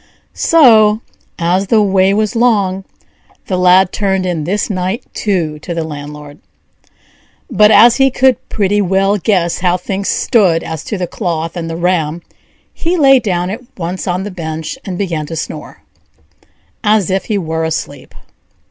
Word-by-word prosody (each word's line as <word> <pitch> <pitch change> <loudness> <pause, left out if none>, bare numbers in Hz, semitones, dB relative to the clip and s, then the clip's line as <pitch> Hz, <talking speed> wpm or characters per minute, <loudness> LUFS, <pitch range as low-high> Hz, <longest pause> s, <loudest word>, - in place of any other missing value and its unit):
'" - - -44 0.2
So, 220 -9 +5 0.4
as 180 +3 0
the 220 +2 +3
way 190 -1 +2
was 215 +3 0
long, 200 -5 +1 0.6
the 190 - -2
Lad 180 +1 +4
turned 190 -2 -1
in 170 -4 -2
this 200 +5 -1
night 190 +4 -3
too 170 -7 -2
to 170 +3 -6
the 165 - -2
landlord; 150 -1 -9 1.1
but 210 -1 +5
as 230 +2 +6
he 270 0 +4
could 260 0 +1
pretty 205 0 0
well 195 +2 +1
guess 175 -3 0
how 180 0 +1
things 195 +2 -4
stood 185 -9 +2
as 160 -1 -6
to 210 - -4
the 180 - -2
cloth 165 -3 -4
and 165 -2 -4
the 165 - -5
ram, 170 -2 -1 0.5
he 350 +2 -1
lay 270 -4 +5
down 180 -5 -2
at 225 +5 -6 0.2
once 180 +2 -4
on 180 +1 -1
the 205 - -6
bench 160 -3 -5
and 185 -3 -5
began 165 -6 -3
to 165 - -6
snore, 160 - -7 1.0
as 210 -3 +2
if 190 -1 -1
he 215 - -1
were 160 -3 -3
asleep. 160 -1 -5
185 Hz, 165 wpm, -14 LUFS, 170-210 Hz, 1.1 s, as